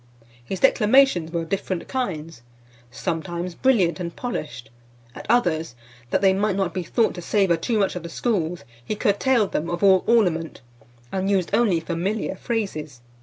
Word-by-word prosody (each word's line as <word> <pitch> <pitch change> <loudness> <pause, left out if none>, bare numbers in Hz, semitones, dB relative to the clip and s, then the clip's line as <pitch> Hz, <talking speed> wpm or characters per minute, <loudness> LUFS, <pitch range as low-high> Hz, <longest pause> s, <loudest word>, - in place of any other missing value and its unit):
His 185 +10 -5
declamations 245 -8 +4
were 170 -1 -1
of 165 - -10
different 185 -2 -3
kinds; 165 - -4 0.5
sometimes 175 +4 -4
brilliant 195 -8 +2
and 170 -1 -5
polished, 150 - -5 0.4
at - - -10
others, 165 - +1 0.3
that - - +1
they 190 -1 +5
might 200 0 0
not 195 -2 -1
be 185 - -2
thought 225 +6 +1
to 175 - -7
savour 190 -1 +2
too 215 +8 -1
much 195 -3 +1
of 180 - -4
the 170 - -8
schools, 175 - -1 0.2
he 215 - -3
curtailed 210 +2 +2
them 165 +3 -2
of 175 +3 -3
all 190 -2 +5
ornament, 180 -9 +1 0.5
and 190 +1 -1
used 190 -4 0
only 205 -8 +3
familiar 180 +6 -2
phrases. 160 - -4
185 Hz, 165 wpm, -23 LUFS, 165-210 Hz, 0.5 s, they